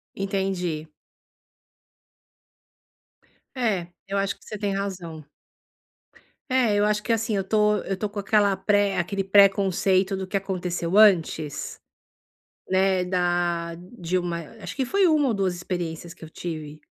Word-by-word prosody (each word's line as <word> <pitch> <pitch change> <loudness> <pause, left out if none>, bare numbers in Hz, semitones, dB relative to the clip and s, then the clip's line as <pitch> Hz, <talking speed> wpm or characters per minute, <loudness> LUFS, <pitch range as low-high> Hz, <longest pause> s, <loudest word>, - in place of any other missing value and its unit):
Entendi. 190 -5 -2 2.7
É, 205 -8 0 0.2
eu 200 0 -3
acho 195 0 -1
que - - -24
você 215 - -7
tem 200 -1 -1
razão. 180 -6 -5 1.2
É, 250 -5 +3
eu 205 0 +3
acho 210 0 +1
que 230 - -2
assim. 225 -1 0
Eu 195 - 0
tô 210 +1 +2
eu 195 - -3
tô 210 - -2
com 205 0 -6
aquela 205 -1 +3
pré 200 0 +1
aquele 195 +3 -1
preconceito 195 -1 +4
do 190 0 -4
que 195 +1 0
aconteceu 180 -2 -3
antes, 165 -8 +3 0.9
né, 190 -1 +3
da 175 -2 0
de 180 0 -5
uma 175 -2 -1 0.2
acho - - -7
que 270 - 0
foi 390 +6 +3
1 300 -4 +3
ou 235 - +1
2 190 -3 0
experiências 175 -1 -5
que 160 - -12
eu 160 - -11
tive. 155 -3 -6
190 Hz, 140 wpm, -25 LUFS, 175-205 Hz, 2.7 s, preconceito